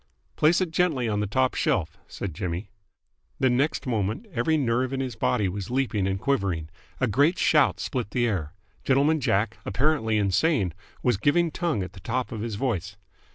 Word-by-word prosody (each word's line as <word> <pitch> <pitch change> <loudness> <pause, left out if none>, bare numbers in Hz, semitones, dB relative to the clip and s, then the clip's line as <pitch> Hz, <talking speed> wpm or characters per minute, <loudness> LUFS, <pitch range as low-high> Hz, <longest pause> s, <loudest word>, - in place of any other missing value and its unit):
"Place 165 +5 +4
it 180 -3 -1
gently 160 -8 +1
on 105 -2 0
the 105 - -1
top 130 +5 +1
shelf," 80 -3 0
said 95 -5 -5
Jimmy. 90 +5 -4 0.7
The 130 -2 +3
next 140 +5 0
moment 110 - -1
every 160 -1 +1
nerve 130 -1 0
in 135 - -1
his 130 -4 -3
body 110 -2 +1
was 95 0 -4
leaping 120 -6 0
and 95 0 -1
quivering. 95 - -1 0.3
A 130 - +3
great 140 - +3
shout 150 -3 +3
split 125 -6 -3
the 120 0 +1
air. 95 -8 -2 0.3
Gentleman 145 +4 +3
Jack, 115 -4 0
apparently 110 0 +1
insane, 100 - +2 0.3
was 125 -5 +2
giving 160 - +2
tongue 160 - -1
at 90 - -8
the 95 - -11
top 125 +8 -2
of 110 -3 -5
his 115 -2 -3
voice. 100 -4 -2
120 Hz, 180 wpm, -26 LUFS, 100-140 Hz, 0.7 s, Place